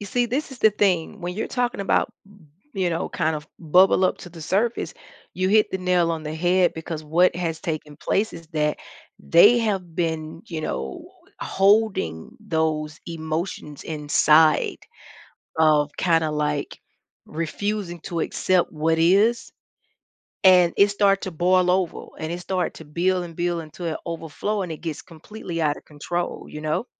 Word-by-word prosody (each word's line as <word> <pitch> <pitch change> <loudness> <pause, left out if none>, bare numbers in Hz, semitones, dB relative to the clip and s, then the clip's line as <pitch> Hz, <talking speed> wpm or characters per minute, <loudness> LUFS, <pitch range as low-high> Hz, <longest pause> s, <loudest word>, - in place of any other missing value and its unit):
You 205 - -7
see, 245 +4 +1
this 265 +6 -2
is 265 - -10
the 220 - +5
thing, 195 -1 0
when 175 0 -4
you're 215 - -2
talking 245 -4 -1
about, 195 - +1
m 200 -6 -20 0.2
you 190 -3 0
know, 165 -1 -2
kind 160 -2 -1
of 150 0 -7
bubble 185 +4 +4
up 185 - +1
to 175 - -10
the 165 -1 -12
surface 210 +9 -1 0.4
you 185 0 0
hit 215 +1 +4
the 190 - -1
nail 180 -2 +2
on 160 -1 -4
the 155 0 -5
head 175 +2 +2
because 160 -1 -6
what 165 +4 +3
has 165 -2 -3
taken 155 -2 -5
place 215 +8 0
is 165 -1 -10
that 150 -2 0 0.4
they 205 +8 +6
have 190 -7 -2
been, 160 -1 -2
you 165 -5 -5
know, 65 - -4 0.4
h - - -4
holding 195 - +2
those 155 -2 -2
emotions 160 -2 -5
inside 155 0 +3 0.8
of 155 -2 +4
kinda, 165 -3 +2
like, 150 -1 -2 0.5
refusing 175 +3 -3
to 170 0 -4
accept 185 +1 +1
what 160 +1 0
is 200 +8 +3 0.9
and 180 -2 +6
it 200 - +6
start 200 -1 +2
to 190 - -4
boil 180 +2 +2
over, 185 -2 -1
and 160 +1 -4
it 175 - -4
start 185 0 -2
to 160 - -11
build, 180 +4 0
and 165 -1 -11
build 175 0 -1
until 160 +2 -9
it 160 - -2
overflow, 170 +5 -3
and 175 - -5
it 155 - -7
gets 160 -3 -5
completely 170 +1 -7
out 150 -1 +1
of - - -15
control, 175 +4 -4
you 150 - -8
know. 155 +9 -1
170 Hz, 170 wpm, -23 LUFS, 155-190 Hz, 0.9 s, they